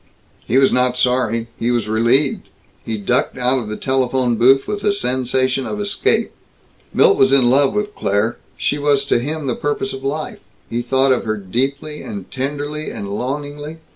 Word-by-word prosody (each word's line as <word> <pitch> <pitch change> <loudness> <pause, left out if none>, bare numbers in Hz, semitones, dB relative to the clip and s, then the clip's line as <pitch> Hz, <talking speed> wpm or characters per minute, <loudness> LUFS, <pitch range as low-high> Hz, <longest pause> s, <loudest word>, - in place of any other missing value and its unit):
He 125 - +2
was 135 0 +4
not 125 0 +2
sorry. 125 -2 +1
He 115 - 0
was 120 -3 0
relieved. 115 +6 +1 0.3
He 110 -1 -3
ducked 125 +7 0
out 125 +1 +2
of 110 -3 -6
the 110 - -4
telephone 130 -2 0
booth 130 +4 +4
with 205 -1 -3
a 205 - +3
sensation 130 -4 0
of 210 - -4
escape. 205 -1 0 0.6
Milt - - +4
was 135 0 +5
in 130 -3 +5
love 140 +7 +3
with 210 0 -1
Claire; 105 - 0 0.2
she 145 - 0
was 145 -1 +2
to 140 - +2
him 150 +4 -4
the 130 - 0
purpose 145 +10 -2
of 135 0 -8
life; 150 +3 -3 0.3
he 120 +1 -1
thought 130 +2 +2
of 125 - +1
her 110 -1 -1
deeply 135 +9 -3
and 100 -3 -8
tenderly 145 +3 -3
and 100 - -6
longingly. 145 +6 -4
130 Hz, 180 wpm, -19 LUFS, 120-145 Hz, 0.6 s, was